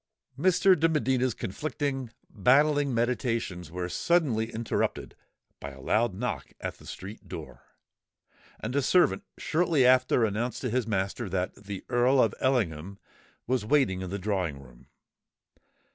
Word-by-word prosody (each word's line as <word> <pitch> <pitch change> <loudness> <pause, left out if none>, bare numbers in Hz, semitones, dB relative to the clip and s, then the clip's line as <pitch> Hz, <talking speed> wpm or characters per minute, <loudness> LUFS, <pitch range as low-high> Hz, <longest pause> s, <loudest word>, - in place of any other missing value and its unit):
Mr. 185 +5 +4
de 165 +2 +4
Medina's 130 -5 +1
conflicting—battling 140 +2 0
meditations 115 - -1
were 90 +1 -4
suddenly 115 - +1
interrupted 115 0 -2 0.4
by 70 - -6
a 70 -1 -13
loud 110 - +1
knock 125 +5 -4
at - - -5
the - - -14
street 100 +3 -9
door; 65 -2 -8 1.0
and 120 +5 -4
a 140 - +3
servant 180 +8 +3 0.2
shortly 160 -4 +2
after 130 -2 +4
announced 110 +4 -2
to 125 - -2
his 125 -1 0
master 100 +1 -2
that 90 0 -1
the 100 -1 -8
Earl 125 +2 +3
of 115 -5 +3
Ellingham 100 - 0 0.5
was 125 -2 0
waiting 105 -7 +2
in 95 - -5
the 100 - -3
drawing 90 -7 -2
room. 65 -3 -16
115 Hz, 135 wpm, -28 LUFS, 95-135 Hz, 1.0 s, Mr